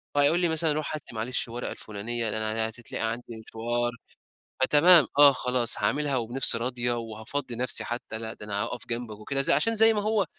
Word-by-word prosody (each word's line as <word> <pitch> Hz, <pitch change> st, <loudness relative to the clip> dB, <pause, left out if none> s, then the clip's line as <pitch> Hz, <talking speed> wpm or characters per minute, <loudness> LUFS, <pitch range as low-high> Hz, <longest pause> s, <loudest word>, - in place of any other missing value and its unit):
فهيقول 145 Hz, +4 st, +3 dB
لي 175 Hz, -2 st, +2 dB
مثلًا 160 Hz, -1 st, +1 dB
روْح 155 Hz, 0 st, -3 dB
هات 150 Hz, -, -6 dB
لي 115 Hz, -, -12 dB
معلش 120 Hz, +4 st, -2 dB
ورقة 120 Hz, +1 st, -5 dB
الفُلانية 110 Hz, +2 st, -5 dB
لأن 110 Hz, +1 st, -3 dB
ه 110 Hz, -, 0 dB
هتتلاقي 115 Hz, 0 st, -4 dB
عندي 120 Hz, +2 st, -6 dB, 0.2 s
مشوار، 120 Hz, +2 st, -2 dB, 0.7 s
فتمام، 160 Hz, +4 st, +6 dB
آه، 145 Hz, -1 st, +9 dB
خلاص 125 Hz, -2 st, 0 dB
هاعملها 145 Hz, -1 st, 0 dB
وبنِفس 120 Hz, +2 st, +2 dB
راضية 120 Hz, 0 st, -1 dB
وهافضّي 115 Hz, +3 st, -5 dB
نَفْسي 125 Hz, +1 st, +2 dB
حتى، 120 Hz, -2 st, -6 dB
لأ 110 Hz, 0 st, -6 dB
ده 105 Hz, -, -11 dB
أنا 105 Hz, 0 st, -2 dB
هاقف 120 Hz, +2 st, -6 dB
جنبك 115 Hz, -3 st, -4 dB
وكده، 135 Hz, +6 st, -1 dB
زي 140 Hz, -, +3 dB
عشان 225 Hz, +11 st, +2 dB
زي 225 Hz, +1 st, +7 dB
ما 210 Hz, -, +1 dB
هو 215 Hz, -1 st, +1 dB
120 Hz, 195 wpm, -26 LUFS, 115-145 Hz, 0.7 s, آه